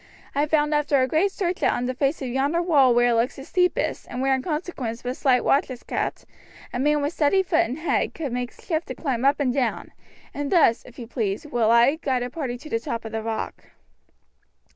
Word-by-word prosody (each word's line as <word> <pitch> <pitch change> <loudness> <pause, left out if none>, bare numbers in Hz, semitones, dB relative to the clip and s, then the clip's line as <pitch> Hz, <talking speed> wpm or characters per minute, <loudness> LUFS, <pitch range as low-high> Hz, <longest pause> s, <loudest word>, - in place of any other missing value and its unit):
I 290 +2 +1
found 300 0 +2
after 295 -1 +2
a 255 - +2
great 330 +9 +2
search 365 -2 -2
that - - +3
on 245 - -2
the 255 - -1
face 275 +2 -1
of - - -3
yonder 275 +6 0
wall 285 -8 +4
where 240 0 +4
it - - +3
looks 230 +2 +1
the 270 - -9
steepest, 360 +2 0
and 245 - -5
where 270 +1 +2
in 265 - 0
consequence 300 -7 -4
but 250 +1 -3
slight 260 -3 +2
watch 280 - +2
is 255 -2 -8
kept, - - -3 0.5
a 245 - -2
man 295 +2 +2
with 290 +3 -1
steady 350 +6 +3
foot 340 -3 +1
and 250 +5 -5
head 320 - -1
could 290 -7 -4
make 245 -1 -3
shift 325 -2 -4
to - - -5
climb 260 -6 -2
up 280 +2 +3
and 260 -4 +1
down, 255 -3 -1 0.4
and 285 0 -4
thus, 295 -10 +4
if 250 - -15
you 240 - -7
please, 225 +2 -3
will 240 -6 +1
I 235 +6 +5
guide 260 -6 -1
a 245 - -5
party 260 -6 -4
to 305 +5 -12
the 230 - +1
top 230 0 -5
of 220 - -6
the 225 - -3
rock." 220 0 -4
270 Hz, 235 wpm, -24 LUFS, 245-300 Hz, 0.5 s, I